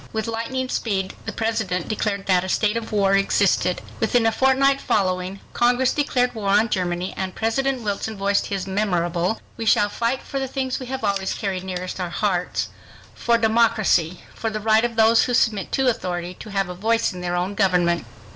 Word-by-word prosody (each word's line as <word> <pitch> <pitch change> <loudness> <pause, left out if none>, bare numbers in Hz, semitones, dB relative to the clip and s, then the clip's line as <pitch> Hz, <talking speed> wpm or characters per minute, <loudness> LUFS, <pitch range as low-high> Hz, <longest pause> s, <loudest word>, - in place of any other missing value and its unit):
With 220 -1 -2
lightning 230 +3 -3
speed 195 -6 -2
the - - -1
President 220 -6 -2
declared 205 -2 -2
that 180 -2 +3
a 190 - -4
state 210 +3 +1
of 230 -1 -4
war 200 -2 +2
existed. 195 -2 +2 0.2
Within 225 +1 +2
a 225 - +4
fortnight 270 +2 +3
following, 185 -1 -1
Congress 245 +1 +2
declared 250 -4 +1
war 210 -4 -3
on 210 +3 +4
Germany 180 -1 -2
and 190 -1 -4
President 255 +3 0
Wilson 210 +1 -3
voiced 200 +1 +1
his 195 -2 -3
memorable, 185 -1 0 0.2
"We 225 - -4
shall 205 -1 +4
fight 235 +5 -1
for 275 - -4
the 265 - -2
things 260 0 -2
we 255 - -7
have 265 -1 -4
always 195 -2 0
carried 190 -3 -3
nearest 185 0 -5
our 180 -1 -2
hearts—for 200 +5 -2
democracy—for 220 -4 +1
the 215 0 -4
right 220 +1 +3
of 240 -1 -1
those 225 0 +5
who 245 - 0
submit 215 -5 +1
to 265 -1 +2
authority 180 -6 -2
to 215 - -11
have 195 -2 -1
a 180 - -5
voice 225 +3 0
in 180 - -7
their 175 0 -2
own 180 +3 -1
government." 175 - +1
210 Hz, 185 wpm, -22 LUFS, 185-230 Hz, 0.2 s, those